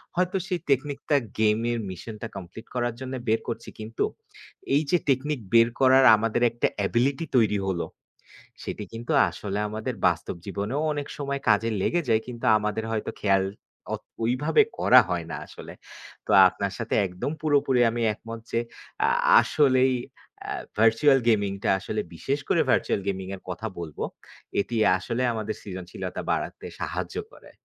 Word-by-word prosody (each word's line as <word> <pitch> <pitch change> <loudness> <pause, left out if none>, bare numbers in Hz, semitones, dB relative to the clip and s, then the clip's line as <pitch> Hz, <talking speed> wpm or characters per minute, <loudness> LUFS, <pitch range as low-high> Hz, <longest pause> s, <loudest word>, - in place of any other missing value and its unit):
হয়তো 180 +2 +1
সেই 180 -2 -1
টেকনিকটা 140 +2 0 0.2
গেম 110 0 +3
এর 120 - -1
মিশনটা 105 +4 -7
কমপ্লিট 95 +4 -9
করার 120 -1 0
জন্য 130 0 -6
বের 110 +1 +3
করছি। 115 0 -5
কিন্তু 110 +1 -3 0.7
এই 145 - +4
যে 180 - +5
টেকনিক 135 +2 +1
বের 115 0 +7
করার 130 0 +6
আমাদের 115 +2 -1
একটা 120 - +1
অ্যাবিলিটি 125 +9 +1
তৈরি 105 -3 +3
হলো, 90 -3 -1 0.8
সেটি 105 - -5
কিন্তু 115 +1 -5 0.2
আসলে 100 0 -4
আমাদের 110 +3 -4
বাস্তব 85 0 -1
জীবনেও 100 +8 -2
অনেক 145 -1 -3
সময় 140 -1 -3
কাজে 110 +2 +3
লেগে 175 - +1
যায় 110 0 +3
কিন্তু 125 0 -6
আমাদের 105 +1 -2
হয়তো 110 -1 -2
খেয়াল 95 -2 +3 0.5
অত - - -4 0.2
ঐ - - +2 0.2
ভাবে 430 - +5 0.2
করা - - +7
হয় - - -2
না - - -3
আসলে। - - -10 0.5
তো - - -2 0.2
আপনার 100 +1 -3
সাথে 115 -1 -2
একদম 90 +10 -4
পুরোপুরি 140 -4 +3
আমি 120 +1 -3
একমত 115 +2 -8
যে, 115 - +1 0.5
আ - - +4 0.3
আসলেই 130 -3 +3 0.5
এ্যা - - -4 0.2
ভার্চুয়াল 115 +6 +5
গেমিং 100 -4 +3
টা, - - +1
আসলে 105 +2 -3
বিশেষ 140 - -2
করে - - +4
ভার্চুয়াল - - +1
গেমিং 95 -1 -2
এর 95 - -14
কথা 90 +5 -4
বলবো। 80 -4 -5 0.6
এটি 120 - -5 0.2
আসলে 115 +7 -2
আমাদের 110 -1 -3
সৃজনশীলতা 95 -3 -6
বাড়াতে - - -3 0.2
সাহায্য - - -4 0.2
করে। - - -16
115 Hz, 160 wpm, -26 LUFS, 105-130 Hz, 0.8 s, বের